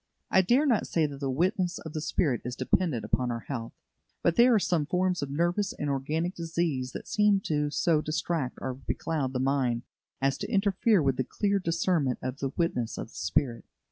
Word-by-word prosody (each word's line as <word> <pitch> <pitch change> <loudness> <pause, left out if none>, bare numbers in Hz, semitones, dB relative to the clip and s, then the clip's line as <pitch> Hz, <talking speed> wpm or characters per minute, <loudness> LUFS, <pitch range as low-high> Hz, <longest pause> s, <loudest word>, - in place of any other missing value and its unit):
I 190 - +6
dare 245 +10 +3
not 240 -8 +2
say 165 -2 +2
that 140 -2 -5
the 140 -1 -2
witness 180 - 0
of 160 - -8
the 155 - -3
Spirit 140 -6 0
is 125 +1 -4
dependent 130 - 0
upon 125 +3 0
our 115 -1 -3
health, 115 -4 -5 0.5
but 170 - +3
there 245 +2 +6
are - - +5
some 170 -6 0
forms 180 +1 +1
of 140 - -3
nervous 175 +7 0
and 145 -1 -2
organic 155 +6 -1
disease 165 -7 -2
that - - -7
seem 210 -1 +3
to 150 -4 0
so 155 +1 +2
distract 155 -3 -2
or 130 - -3
becloud 135 +2 -2
the 130 - -2
mind 130 -3 +1 0.4
as 135 0 +1
to - - -4
interfere 200 -1 +3
with 135 -2 +1
the 130 - +1
clear 200 - 0
discernment 165 -6 +1
of 130 +1 -4
the 135 - -1
witness 125 -9 -1
of - - -5
the - - -19
Spirit. 115 +6 0
155 Hz, 205 wpm, -28 LUFS, 130-180 Hz, 0.5 s, I